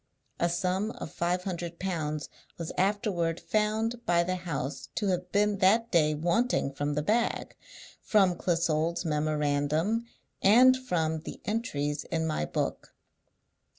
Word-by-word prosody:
A 170 Hz, -, +2 dB
sum 185 Hz, +4 st, 0 dB
of -, -, -7 dB
five 180 Hz, +1 st, -1 dB
hundred 175 Hz, -2 st, -4 dB
pounds 155 Hz, -5 st, -3 dB, 0.3 s
was 165 Hz, -2 st, -5 dB
afterward 185 Hz, -4 st, 0 dB
found 220 Hz, +2 st, 0 dB
by 170 Hz, -3 st, +3 dB
the 185 Hz, +2 st, -1 dB
house 165 Hz, -5 st, -4 dB
to 205 Hz, -3 st, 0 dB
have 180 Hz, -1 st, -2 dB
been 205 Hz, 0 st, +2 dB
that 225 Hz, +5 st, +3 dB
day 155 Hz, -3 st, +3 dB
wanting 170 Hz, -, +1 dB
from 145 Hz, +1 st, -2 dB
the 150 Hz, -, 0 dB
bag, 230 Hz, +7 st, 0 dB, 0.5 s
from 195 Hz, -4 st, +3 dB
Clissold's 170 Hz, -1 st, 0 dB
memorandum, 155 Hz, +7 st, 0 dB, 0.3 s
and 250 Hz, +6 st, +7 dB
from 165 Hz, -11 st, -1 dB
the 155 Hz, -, -8 dB
entries 150 Hz, -, -2 dB
in 160 Hz, -1 st, -1 dB
my 155 Hz, -, -1 dB
book. -, -, -3 dB
175 Hz, 135 wpm, -29 LUFS, 155-210 Hz, 0.5 s, and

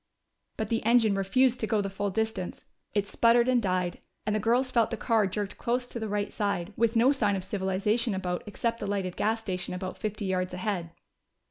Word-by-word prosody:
But 220 Hz, -1 st, -2 dB
the 225 Hz, -, 0 dB
engine 225 Hz, -2 st, +4 dB
refused 240 Hz, +6 st, +2 dB
to 220 Hz, -, -1 dB
go 215 Hz, -, +2 dB
the 200 Hz, -, 0 dB
full 195 Hz, +1 st, -2 dB
distance: 220 Hz, -2 st, -3 dB, 0.3 s
it 205 Hz, -1 st, +1 dB
sputtered 235 Hz, +2 st, +4 dB
and 255 Hz, -2 st, +3 dB
died, 185 Hz, -3 st, -1 dB, 0.3 s
and 210 Hz, -, 0 dB
the -, -, +1 dB
girls 245 Hz, +4 st, +2 dB
felt 230 Hz, -3 st, +3 dB
the 230 Hz, -, -3 dB
car 220 Hz, -1 st, +2 dB
jerked 205 Hz, +1 st, -4 dB
close 245 Hz, +1 st, 0 dB
to 245 Hz, -, -6 dB
the 220 Hz, -1 st, -3 dB
right 205 Hz, 0 st, -1 dB
side, 200 Hz, -2 st, -1 dB
with 230 Hz, 0 st, +1 dB
no 240 Hz, +4 st, +5 dB
sign 210 Hz, -8 st, +2 dB
of 190 Hz, -, -3 dB
civilization 200 Hz, +3 st, 0 dB
about 180 Hz, -2 st, -2 dB
except 230 Hz, +2 st, -2 dB
the 205 Hz, -, -4 dB
lighted 195 Hz, -3 st, -2 dB
gas 225 Hz, +1 st, 0 dB
station 180 Hz, -3 st, -3 dB
about 185 Hz, 0 st, -5 dB
fifty 215 Hz, -1 st, -3 dB
yards 185 Hz, -1 st, -1 dB
ahead. 185 Hz, -3 st, -2 dB
210 Hz, 210 wpm, -28 LUFS, 190-230 Hz, 0.3 s, no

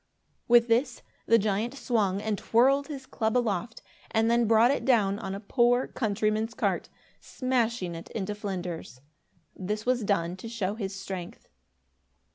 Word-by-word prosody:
With 240 Hz, 0 st, +6 dB
this, 235 Hz, +4 st, +1 dB, 0.2 s
the 230 Hz, -, +6 dB
giant 215 Hz, +4 st, -1 dB
swung 210 Hz, -7 st, 0 dB
and 220 Hz, -1 st, 0 dB
twirled 270 Hz, +7 st, +3 dB
his 275 Hz, -4 st, -7 dB
club 220 Hz, -2 st, -1 dB
aloft 225 Hz, -2 st, -2 dB, 0.3 s
and 225 Hz, +1 st, +2 dB
then 235 Hz, -1 st, +3 dB
brought 225 Hz, +3 st, +5 dB
it 280 Hz, -, -1 dB
down 205 Hz, -6 st, +2 dB
on 195 Hz, -3 st, -4 dB
a -, -, -5 dB
poor 245 Hz, +3 st, +2 dB
countryman's 215 Hz, 0 st, -1 dB
cart, -, -, -1 dB, 0.3 s
smashing 235 Hz, -8 st, -1 dB
it 165 Hz, 0 st, -9 dB
into 210 Hz, -1 st, -3 dB
flinders. 180 Hz, -, -6 dB, 0.5 s
This 210 Hz, +3 st, -4 dB
was 250 Hz, -2 st, +1 dB
done 180 Hz, -3 st, 0 dB
to 225 Hz, +4 st, -8 dB
show 205 Hz, -4 st, -2 dB
his 200 Hz, -3 st, -5 dB
strength. 190 Hz, -2 st, -7 dB
220 Hz, 150 wpm, -28 LUFS, 195-240 Hz, 0.5 s, With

